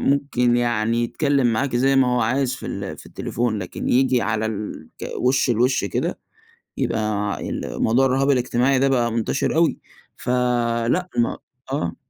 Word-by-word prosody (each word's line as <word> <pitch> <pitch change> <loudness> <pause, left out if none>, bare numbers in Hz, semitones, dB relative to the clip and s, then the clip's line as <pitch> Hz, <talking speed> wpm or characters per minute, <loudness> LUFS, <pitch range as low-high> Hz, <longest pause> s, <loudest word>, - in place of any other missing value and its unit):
ممكن 135 -4 +2
يعني 115 -1 +1
يتكلّم 140 +1 +1
معاكِ 125 +2 0
زي 135 +2 +3
ما 135 -1 +5
هو - - +2
عايز 130 +3 +1
في 135 - -8
ال - - -5
في - - -12
التليفون 120 -2 -2
لكن 95 -3 -5
ييجي 125 -1 +3
على 110 0 0
الك 105 -7 -6 0.3
وِش 130 +1 +2
لوِش 125 +3 +2
كده، - - -2 0.6
يبقى 105 -2 -1
ال - - -3
موضوع 120 +4 +3
الرُهاب 135 +2 +2
الاجتماعي 125 +1 +2
ده 135 - +3
بقى 120 -3 +1
مُنتشر 115 +6 -1
أوي 165 0 +2 0.4
فلأ 125 +5 0
ما 120 - +1 0.3
آه. 110 - -2
125 Hz, 155 wpm, -22 LUFS, 115-135 Hz, 0.6 s, ما